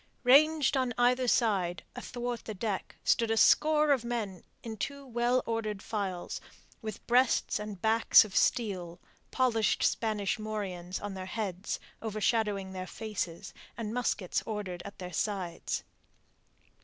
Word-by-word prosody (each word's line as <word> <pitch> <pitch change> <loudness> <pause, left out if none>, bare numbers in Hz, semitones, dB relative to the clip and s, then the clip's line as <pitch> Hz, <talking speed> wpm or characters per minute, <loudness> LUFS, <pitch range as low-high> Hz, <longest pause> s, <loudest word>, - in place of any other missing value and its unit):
Ranged 295 +3 +5
on 255 -3 0
either 250 +1 +3
side, 195 -7 +1
athwart 245 -1 -4
the 215 - -5
deck, 200 0 -3
stood 230 -1 +2
a 225 - +1
score 305 +4 +5
of 265 -4 +3
men 225 -6 -3 0.2
in 225 -1 -5
two 280 +5 -4
well 240 0 +1
ordered 215 -3 -2
files, 195 -5 -3 0.4
with 215 -3 -7
breasts 250 -2 +3
and 210 -2 -6
backs 220 +2 +6
of 205 - -10
steel, 185 -7 +1 0.3
polished 235 -4 +2
Spanish 215 -1 0
morions 195 -4 -4
on 205 -1 -5
their 185 -1 -6
heads, 195 -2 -3 0.2
overshadowing 210 -3 0
their 185 0 -5
faces, 200 -5 -5 0.2
and 220 -2 -4
muskets 230 -6 0
ordered 200 -5 -4
at 200 - -9
their 180 -1 -7
sides. 180 -1 -2
215 Hz, 135 wpm, -30 LUFS, 195-240 Hz, 0.4 s, backs